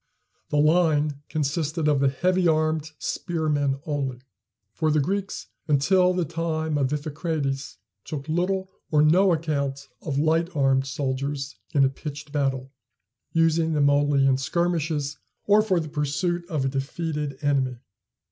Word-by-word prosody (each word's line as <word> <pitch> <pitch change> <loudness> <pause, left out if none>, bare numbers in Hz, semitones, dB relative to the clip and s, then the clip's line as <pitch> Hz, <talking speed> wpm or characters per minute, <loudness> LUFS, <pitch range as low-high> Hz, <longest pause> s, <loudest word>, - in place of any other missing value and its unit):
The 150 - 0
line 150 -2 +3
consisted 155 +1 -1
of 145 -2 +3
the 135 0 +3
heavy 180 +6 +1
armed 155 -1 +1
spearmen 150 -5 -1
only; 135 -5 -2 0.5
for 160 -1 0
the 155 0 +3
Greeks 195 +7 -2 0.2
until 180 +6 +4
the 180 -2 0
time 160 -1 -2
of 135 -1 +1
Iphicrates 145 -2 -3 0.3
took 145 -2 -6
little 190 +4 -1 0.2
or 150 -1 +4
no 180 +5 +5
account 140 -4 -2
of 140 -3 -3
light 160 +3 +2
armed 135 -1 +2
soldiers 135 +1 -3 0.2
in 140 -1 +6
a - - +3
pitched 145 +1 -8
battle, 135 -2 -1 0.6
using 165 0 +2
them 145 -1 +4
only 145 -1 +3
in 135 -1 +4
skirmishes, 155 -1 -1 0.3
or 210 +1 +5
for 190 -5 +1
the 160 - -4
pursuit 160 +4 -2
of 150 -6 -1
a - - +1
defeated 145 +1 -3
enemy. 135 -3 +1
150 Hz, 140 wpm, -25 LUFS, 140-165 Hz, 0.6 s, in